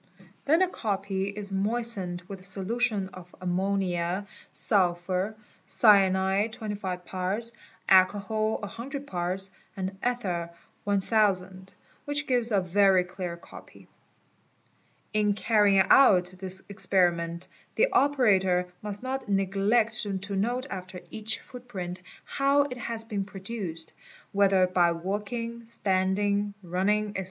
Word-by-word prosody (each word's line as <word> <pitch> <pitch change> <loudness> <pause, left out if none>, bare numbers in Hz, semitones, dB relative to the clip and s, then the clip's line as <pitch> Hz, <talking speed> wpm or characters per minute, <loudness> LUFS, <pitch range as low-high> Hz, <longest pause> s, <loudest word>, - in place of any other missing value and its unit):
Then 320 +5 +3
the 375 - +4
copy 195 - -2
is 200 -1 -5
moistened 195 -3 0
with 195 -1 -8
a - - -15
solution 200 +1 0
of 180 -1 -13
ammon. 190 +2 0 0.7
sulf. 185 +1 +2 0.3
cyanide 195 0 +4
25 200 -5 -5
parts, 195 +6 -2 0.3
alcohal 205 +3 +3
100 265 +7 -6
parts, 185 -2 -1 0.3
and 190 0 -4
ether 190 -9 -2 0.4
1000, 195 -2 0 0.3
which 290 0 0
gives 245 -3 +3
a 200 -2 +3
very 190 0 +3
clear 180 -1 -6
copy - - -14 1.3
"8", 215 0 +2
_ - - +2
In 205 - +3
carrying 205 -2 +3
out 185 -9 +6
this 190 0 +1
experiment 175 -4 0 0.3
the - - +4
operator 190 -10 +2
must 205 +1 0
not 260 -2 -4
neglect 200 +4 +2 0.2
to 200 0 -4
note 240 +6 -1
after 185 -1 -7
each 220 -1 -1
footprint 190 -8 -8 0.2
how 280 +1 +2
it 250 -3 -6
has 225 -1 -3
been 205 -3 -3
produced, 190 -4 -6 0.4
whether 195 -2 +4
by 180 -1 +2
walk 195 +5 -4
ng, 235 -1 -5
standing, 200 -1 0
running, 205 +4 0
&c. - - -3
200 Hz, 120 wpm, -27 LUFS, 185-220 Hz, 1.3 s, out